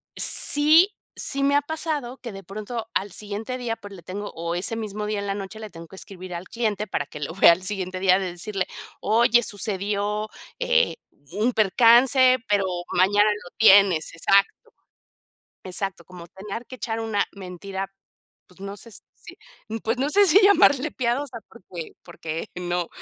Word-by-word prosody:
sí 310 +6 +5 0.2
sí 275 0 -3
me 280 +1 +3
ha 285 - +4
pasado 290 -4 -4
que 235 -3 -8
de 195 0 -9
pronto 215 +4 -6
al 200 +1 -1
siguiente 210 +6 -5
día, 240 -2 -3
por 205 -2 -12
le 185 -3 -11
tengo 200 +4 -6
o 170 +1 -4
ese 200 +5 -2
mismo 210 -1 -5
día 210 -1 -2
en 200 - -5
la 195 - -2
noche 200 +2 -7
le 215 -1 -8
tengo 165 -2 -11
que 190 - -14
escribir 185 -2 -9
al 175 +2 -7
cliente 215 -2 -2
para - - -2
que 150 - -11
lo 145 +2 -5
vea 195 - +7
al 180 +2 0
siguiente 185 -2 -4
día 185 0 +4
de 185 -2 -3
decirle: 190 +2 -3 0.4
"Oye, 235 +2 +3
sucedió, 205 0 -2 0.3
eh, - - +2 0.4
un 220 +6 +1
percance, 245 +5 +5
pero 205 -2 +2 0.3
mañana 205 +3 +4
lo 205 -4 -6
tienes". 195 -7 +5
Exacto. 200 - +1 0.9
Exacto, 185 -1 -4
como 175 -1 -12
tener 200 +6 -8
que 255 - -10
echar 225 -2 -4
una 220 -3 -1
mentira, 190 0 -7 0.5
pues, 180 +1 -21
no 200 +1 -7
sé, 230 - -11
si - - -15 0.3
m 225 +1 -5
pues, 225 +3 -1
no 275 - 0
sé 405 +2 +5
si 380 +5 +6
llamarle 310 -8 +5
piadosa 245 0 -2
porque 180 -6 -10
porque 160 0 -6
no, 175 -1 -2
205 Hz, 175 wpm, -24 LUFS, 190-240 Hz, 0.9 s, vea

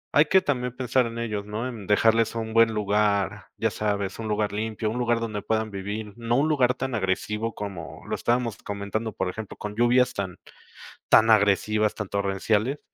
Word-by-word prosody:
hay 150 - +7
que 190 +4 +4
también 125 -7 -2
pensar 125 -1 +1
en 115 0 -7
ellos, 105 -3 -3
¿no? 110 +4 -3
En 110 -6 -7
dejarles 115 +2 +3
un 110 -1 -3
buen 115 0 +5
lugar, 105 -2 0
ya - - 0
sabes, 100 -2 -2
un 110 - -4
lugar 105 -1 0
limpio, 110 +1 -2
un 125 - -3
lugar 120 -1 +1
donde 110 -3 -3
puedan 110 0 -1
vivir, 100 +2 -5
no 120 0 -1
un 145 - +3
lugar 130 -5 +2
tan 130 -1 -3
agresivo 105 +2 -1
como 95 -5 -7
lo - - -4
estábamos 120 -2 0
comentando, 100 +2 -4
por 95 - -2
ejemplo, 105 +3 -6
con 105 0 -6
lluvias 120 +2 +3
tan 95 -3 -4 0.7
tan 110 0 +6
agresivas, 105 0 +3
tan 105 -3 -5
torrenciales. 100 +6 0
110 Hz, 185 wpm, -25 LUFS, 105-115 Hz, 0.7 s, hay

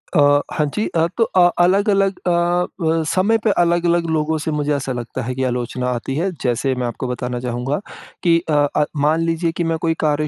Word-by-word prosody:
अ, 145 -1 +5
हाँ 150 - +1
जी। 215 - 0
अ, 165 0 +3
तो 230 - +4
अ 180 -4 +4
अलग-अलग 195 +1 +2
अ, - - +3 0.5
व 160 0 +1
समय 205 +5 +3
पे 220 - +2
अलग-अलग 170 0 +1
लोगों 160 0 0
से 155 +1 -3
मुझे 150 0 0
ऐसा 135 -1 -3
लगता 120 -1 -5
है 125 +2 -3
कि 130 - -2
आलोचना 125 0 -2
आती 125 +2 -3
है। 185 +5 0
जैसे 130 +2 0
मैं 125 -1 -2
आपको 125 +2 -4
बताना 125 0 -3
चाहूँगा 125 +4 -2 0.4
कि 170 -1 +4
अ - - +1 0.2
अ, 150 - +3
मान 155 +3 +2
लीजिए 165 0 0
कि 175 - 0
मैं 165 -1 0
कोई 165 -1 0
कार्य 150 0 +1
155 Hz, 210 wpm, -19 LUFS, 130-170 Hz, 0.5 s, अ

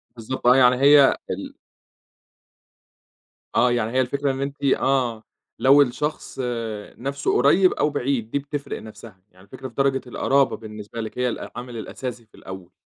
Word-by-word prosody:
بالضبط 120 +2 -4
آه، 125 - +7
يعني 125 -1 +5
هي 140 -1 +6
ال - - -5 2.0
آه، 125 +1 +4
يعني 115 -2 -1
هي 130 +1 +2
الفكرة 140 +2 -1
إن 135 0 -5
أنتِ 140 +1 -5
آه، 130 -4 +1 0.4
لو 140 +2 +6
الشخص 145 +2 -2 0.6
نفسه 140 +2 -2
قريّب 175 +8 +4
أو 150 - +1
بعيد 130 -5 -2
دي 140 - 0
بتفرق 145 0 -6
نفسها. 110 -2 -12
يعني 95 +1 -20
الفكرة 130 +6 -9
في 125 - -15
درجة 135 -1 +1
القَرابة 135 +3 +1
بالنِّسبة 105 +1 -8
لِك 110 +2 -7
هي 125 0 +1
الأه 115 - -5
العامل 120 -1 -7
الأساسي 120 +1 -7
في 110 - -23
الأول. 95 -2 -10
130 Hz, 160 wpm, -23 LUFS, 115-140 Hz, 2.0 s, آه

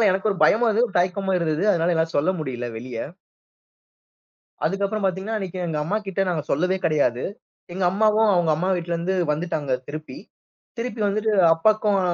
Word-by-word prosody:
அதனால 220 - +4
எனக்கு 190 +3 0
ஒரு 195 - -2
பயமும் 235 +2 +4
இருந்தது, 225 +3 +3
ஒரு 200 - -5
தயக்கமும் 190 +1 0
இருந்துது. 165 +2 -1
அதனால 170 +1 +1
என்னால 160 0 0
சொல்ல 150 +6 +2
முடில்ல 125 -5 -4
வெளிய. 115 0 -6 1.7
அதுக்கு 195 +1 -1
அப்பறம் 210 0 -2
பாத்தீங்கன்னா 190 +4 -2
அன்னிக்கு 190 -3 -5
எங்க 155 - -2
அம்மாகிட்ட 195 +2 -2
நாங்க 160 -4 -1
சொல்லவே 180 +6 +1
கிடையாது. 140 -6 +1 0.5
எங்க 190 +1 -2
அம்மாவும் 215 +2 +3
அவுங்க 175 -3 +2
அம்மா 180 +5 -1
வீட்ல 170 -1 -3
இருந்து 175 +3 -1 0.2
வந்துட்டாங்க 150 -3 -2 0.2
திருப்பி. 155 +1 -7 0.6
திருப்பி 230 -1 -4
வந்துட்டு, 215 +2 0 0.2
அப்பாக்கும் 210 +3 +2
185 Hz, 165 wpm, -23 LUFS, 160-205 Hz, 1.7 s, அதனால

